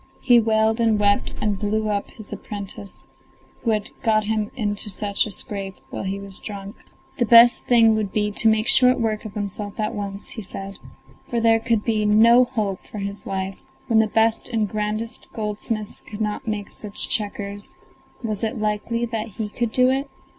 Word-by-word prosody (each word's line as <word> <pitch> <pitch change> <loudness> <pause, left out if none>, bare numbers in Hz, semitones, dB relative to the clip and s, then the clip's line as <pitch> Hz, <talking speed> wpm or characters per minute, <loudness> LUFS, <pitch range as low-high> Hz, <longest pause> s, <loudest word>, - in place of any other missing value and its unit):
He 245 -2 +6
wailed 220 0 +2
and 225 -2 +3
wept 205 0 +2
and 205 -2 -1
blew 215 +1 0
up 205 -1 -2
his 215 -2 -10
apprentice, 200 -1 -8 0.6
who 230 - -1
had 210 -2 -1
got 220 -3 +2
him 215 0 -1
into 210 -3 -2
such 200 +1 -1
a - - -7
scrape 195 0 -4 0.2
while - - -4
he 195 +1 -3
was 195 -1 -9
drunk. 200 0 -8 0.4
The 240 - +3
best 235 +1 +7
thing 230 -2 +6
would 215 -3 -1
be 210 -1 +1
to 225 - +4
make 220 +1 +2
short 255 -1 +6
work 220 -1 -1
of 215 0 -8
himself 205 0 -4
at 215 +2 -1
once, 200 -1 -6
he 225 - -7
said, 195 0 -8 0.5
for 235 - 0
there 225 0 +4
could 225 -2 0
be 220 -2 +1
no 230 +4 +6
hope 215 -6 -3
for - - -9
his 200 0 -6
life; 190 0 -3 0.3
when 225 -2 +3
the 220 - +4
best 225 +1 +1
and 220 -2 0
grandest 215 +2 -3
goldsmiths 215 0 -4
could 210 - -10
not 210 +1 -3
make 210 -2 -3
such 210 -1 -3
checkers, 205 -1 -2 0.5
was 215 -2 -3
it 225 +3 -1
likely 215 +2 -1
that 225 -1 -3
he 215 -2 -3
could 235 +1 -2
do 255 +2 +4
it? 270 +1 -1
215 Hz, 190 wpm, -23 LUFS, 205-225 Hz, 0.6 s, best